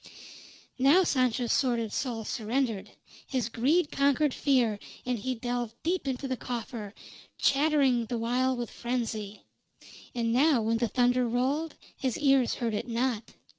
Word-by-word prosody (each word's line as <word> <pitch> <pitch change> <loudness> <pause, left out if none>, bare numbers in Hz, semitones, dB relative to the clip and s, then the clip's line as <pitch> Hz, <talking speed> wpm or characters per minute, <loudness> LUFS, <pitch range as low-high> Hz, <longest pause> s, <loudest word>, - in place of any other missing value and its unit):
Now 290 +9 +6
Sancho's 250 -6 +1
sordid 235 -5 +1
soul 235 -5 -2
surrendered. 230 -2 -2 0.4
His 250 -4 -1
greed 290 +8 +2
conquered 280 0 +2
fear, 245 -7 +2 0.3
and 250 -2 -1
he 255 +4 -2
delved 240 -1 -3
deep 345 -2 -1
into 265 +1 -2
a - - -1
coffer, 230 -3 -6 0.4
chattering 275 -5 +3
the 240 - -2
while 250 +3 +1
with 240 -2 -4
frenzy. 225 -4 -4 0.7
And 230 -1 0
now 280 +1 +4
when 225 +1 +1
the 235 +1 +1
thunder 245 +1 +2
rolled, 270 +7 -1 0.2
his 260 -4 -2
ears 270 -4 +3
heard 230 -2 -2
it 215 +4 -3
not. 235 -1 -2
245 Hz, 140 wpm, -29 LUFS, 230-270 Hz, 0.7 s, Now